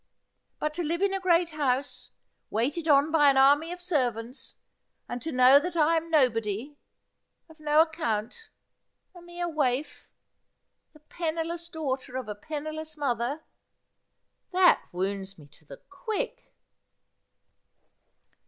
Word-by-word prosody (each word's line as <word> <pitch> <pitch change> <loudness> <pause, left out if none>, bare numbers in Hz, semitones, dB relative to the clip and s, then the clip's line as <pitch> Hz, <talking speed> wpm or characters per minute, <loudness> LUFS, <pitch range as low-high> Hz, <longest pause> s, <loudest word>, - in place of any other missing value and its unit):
But 305 0 -2
to 345 - -3
live 340 +4 -1
in 395 -1 +2
a 390 - -1
great 345 -2 +2
house, 280 -3 -2 0.4
waited 280 +10 -1
on 290 +1 +4
by 295 -3 +5
an 275 - +3
army 290 +5 +5
of 355 - -6
servants, 255 - -2 0.5
and 245 - -5
to 320 - -4
know 255 +2 +7
that 345 +3 -5
I 325 0 +3
am 330 +1 -2
no 300 -5 +5
body, 225 +4 -4 0.7
of 320 -1 -18
no 305 0 +4
account, 310 - -2 0.6
a 355 - -13
mere 345 0 -5
waif, 290 -3 -2 0.8
the 305 - -19
penniless 335 +1 -4
daughter 265 -5 -4
of 260 - -5
a 210 - -3
penniless 310 +6 -6
mother 270 +1 -1 0.5
— - - -51
that 365 0 +5
wounds 195 +1 -3
me 150 - -14
to 150 +2 -24
the 140 -1 -11
quick.' 460 +6 -5
305 Hz, 135 wpm, -27 LUFS, 250-335 Hz, 0.8 s, know